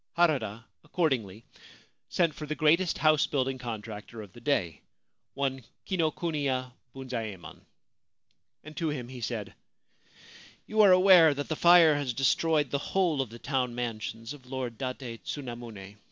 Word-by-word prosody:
Harada, 115 -10 +1 0.2
accordingly, 130 - -1 0.7
sent 170 -4 +1
for 150 - -8
the 155 - -3
greatest 165 +4 +3
house 155 -1 +3
building 135 -2 -1
contractor 110 -2 -7
of 95 -3 -14
the 120 - -14
day, 95 - -1 0.5
one 135 -2 -2 0.2
Kinokuniya 150 -7 -1 0.2
Bunzaemon, 115 -8 -6 1.0
and 155 +1 -11
to 165 -2 -1
him 125 -5 -5
he 130 -2 -9
said: 110 -3 -4 0.6
' - - -22
You 215 0 +2
are 200 -3 +7
aware 185 -5 +7
that 145 +1 -5
the 155 - -1
fire 170 -1 +7
has 135 -4 -3
destroyed 145 +2 +2
the 140 - 0
whole 170 -3 0
of 130 - -4
the 115 - -10
town 125 -2 -2
mansions 115 0 -5
of 130 -4 -15
Lord 125 -3 -5
Date 125 -3 -5
Tsunamune. 120 -7 -7
135 Hz, 145 wpm, -28 LUFS, 115-155 Hz, 1.0 s, are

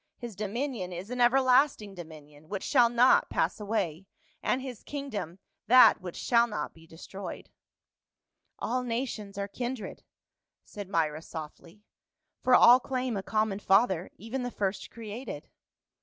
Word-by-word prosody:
His 235 -4 -8
dominion 215 -1 -3
is 180 +6 -7
an 250 0 -2
everlasting 255 -3 +3
dominion, 155 -3 -12
which 200 -2 -4
shall 245 -4 +4
not 240 +2 +4
pass - - 0
away, 195 -5 -2 0.3
and 255 - 0
his 255 -4 -8
kingdom 215 - -6 0.3
that 255 +3 +7
which 180 -2 -7
shall 235 -1 +3
not 210 - -4
be 165 0 -18
destroyed.' 185 +5 -9 0.5
" - - -55
"All 255 +2 0
nations 230 -4 -4
are 200 0 -2
kindred," 240 0 -6 0.6
said 205 -2 -9
Myra 155 -4 0
softly, 165 +5 -10 0.6
"for 255 - +5
all 245 +1 +8
claim 255 -2 -3
a 195 - -2
common 215 0 -1
father, 195 -3 +2
even 230 +5 -5
the 245 - -3
first 200 -4 -3
created." 225 - -8
210 Hz, 140 wpm, -29 LUFS, 190-250 Hz, 0.6 s, all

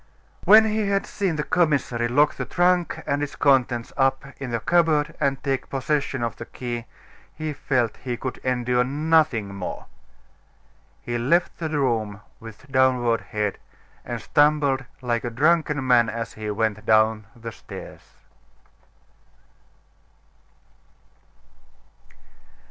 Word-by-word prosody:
When 220 +2 +8
he 215 -1 0
had 200 0 +1
seen 190 -5 -2
the 150 - -1
commissary 140 -9 +1
lock 145 +5 +3
the - - -4
trunk 175 -1 +1
and 145 - -1
its 145 - -4
contents 125 -4 +2
up 135 0 +1
in 135 -3 -6
a 115 - -1
cupboard 160 +2 +2
and 140 -2 +1
take 135 -2 -2
possession 135 -1 -1
of 115 -2 -3
the - - -7
key, 120 -2 -5 0.5
he 155 -1 -4
felt 125 -5 -1
he 125 -2 -4
could 130 +1 -5
endure 125 -1 +1
nothing 145 -6 +1
more. 100 -2 -6 1.2
He 120 0 -3
left 170 +9 +1
the 160 -2 -2
room 115 -9 -1 0.2
with 115 +5 -13
downcast 125 -3 +2
head; 105 -2 -2 0.4
and - - -5
stumbled 145 -3 +2 0.2
like 120 -2 -1
a 120 - -2
drunken 150 +2 +1
man 120 -3 +4
as 115 +1 -5
he 110 -1 -6
went 105 0 -1
down 110 -1 +3
the 115 -1 -7
stairs. - - -10
130 Hz, 125 wpm, -24 LUFS, 115-150 Hz, 1.2 s, When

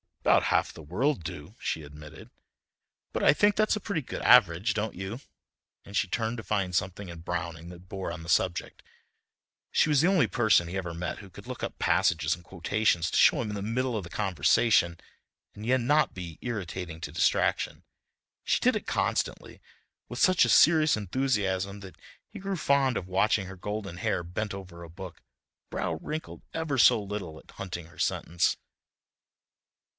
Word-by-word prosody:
"About - - +4
half - - +1
the - - -11
world 105 - -1
do," 80 +5 -8
she 80 - -3
admitted, 75 +1 -12 0.8
"but - - -1
I - - +7
think 205 +6 +3
that's 215 0 +2
a - - -3
pretty 190 -5 -2
good 125 - -6
average, 105 -3 +5
don't 110 +1 -3
you?" 95 +6 -5 0.6
and 100 - -11
she - - +2
turned 115 +5 -2
to 110 - -6
find 100 -4 -1
something 95 +1 -2
in 85 -1 -8
Browning 85 0 -5
that 90 +1 -13
bore 95 -4 -4
on 80 -1 -7
the 85 - -9
subject. 85 +1 0 0.9
She - - +3
was 145 -2 +4
the 170 - +4
only 190 -4 +4
person 110 -8 +3
he 90 +3 -4
ever 90 -3 -4
met 85 -1 -4
who 100 - -12
could - - -13
look - - -7
up - - -4
passages 80 -1 +2
and 85 - -8
quotations 90 -1 0
to - - 0
show - - +5
him 110 - -3
in 105 - -4
the 100 - -4
middle 120 +4 -1
of 100 - -4
the 85 - -9
conversation, 90 0 +2 0.5
and 105 - -9
yet 130 +1 +2
not 150 +6 +2
be 85 -4 -7
irritating 90 -7 -5
to - - -5
distraction. - - +1 0.6
She - - +1
did - - +3
it - - -4
constantly, - - -1 0.5
with 120 - -6
such 185 -1 +5
a - - -1
serious 155 -2 +6
enthusiasm 100 -3 -1
that 95 -2 -11 0.3
he - - -10
grew 195 0 -3
fond 140 -4 +2
of 90 - -3
watching 100 +2 +2
her 95 - -8
golden 100 -2 -5
hair 90 - -1
bent 100 +5 -4
over 95 -3 -9
a 85 - -9
book, 90 +2 -10 0.5
brow - - -2
wrinkled 155 +1 -6
ever 160 -4 -1
so 115 - +6
little 100 -6 -6
at - - -16
hunting 90 -4 -7
her 85 - -18
sentence. 85 0 0
95 Hz, 185 wpm, -28 LUFS, 85-120 Hz, 0.9 s, I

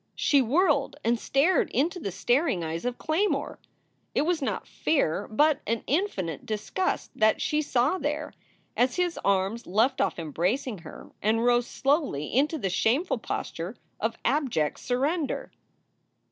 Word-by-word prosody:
She 285 -2 +3
whirled 285 +2 +2
and 235 +1 +2
stared 305 +10 +2
into 325 +8 0
the 200 - -3
staring 240 - +1
eyes 165 +4 -4
of 245 0 -2
Claymore. 345 +7 -1 0.6
It - - +3
was 335 0 0
not 270 - -2
fear, 205 - 0
but 295 +6 +3
an 230 +1 -1
infinite 250 - -1
disgust, 220 - -2
that 215 0 +3
she 305 0 +1
saw 285 +4 +1
there, 300 +1 -3 0.4
as 250 +1 +2
his 355 -1 0
arms 200 +4 0
left 220 +8 +2
off - - 0
embracing 180 - -1
her 160 -1 -11
and 225 +3 +2
rose 240 0 +3
slowly 275 - 0
into 300 +5 +2
the 195 -9 -2
shameful 250 - +1
posture 175 0 -4 0.2
of 225 +1 -1
abject 250 - +1
surrender. 280 +5 -1
250 Hz, 145 wpm, -27 LUFS, 210-300 Hz, 0.6 s, She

